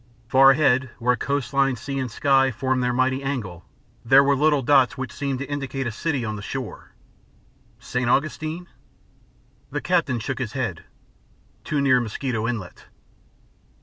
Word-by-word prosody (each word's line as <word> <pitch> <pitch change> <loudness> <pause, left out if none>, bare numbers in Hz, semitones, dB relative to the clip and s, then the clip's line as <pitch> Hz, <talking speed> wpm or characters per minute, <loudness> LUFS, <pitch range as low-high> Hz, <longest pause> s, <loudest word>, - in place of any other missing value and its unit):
Far 135 +2 +6
ahead, 130 -2 +3
where 125 +1 +1
coast 140 +1 -3
line, 135 -1 +2
sea, 135 +3 -5
and 130 -2 -2
sky 135 +3 +3
formed 130 +2 -1
their 125 - +1
mighty 130 +2 +1
angle, 115 -11 -4 0.4
there 135 +4 +6
were 140 0 +3
little 145 0 +2
dots 135 0 +4
which 130 -3 -5
seemed 140 -2 -3
to 140 - -4
indicate 135 -2 -4
a 120 - -2
city 135 +1 -2
on 110 -1 -3
the 105 - -7
shore. 125 +3 -7 0.8
"St. 125 -1 -2
Augustine?" 155 +5 -1 1.0
The - - -3
captain 165 -9 +1
shook 130 +5 -4
his 120 -4 -4
head. 115 -11 -3 0.8
"Too 145 -2 -1
near 130 -3 +4
Mosquito 115 0 -3
Inlet." 110 -7 -5
130 Hz, 155 wpm, -23 LUFS, 120-140 Hz, 1.0 s, Far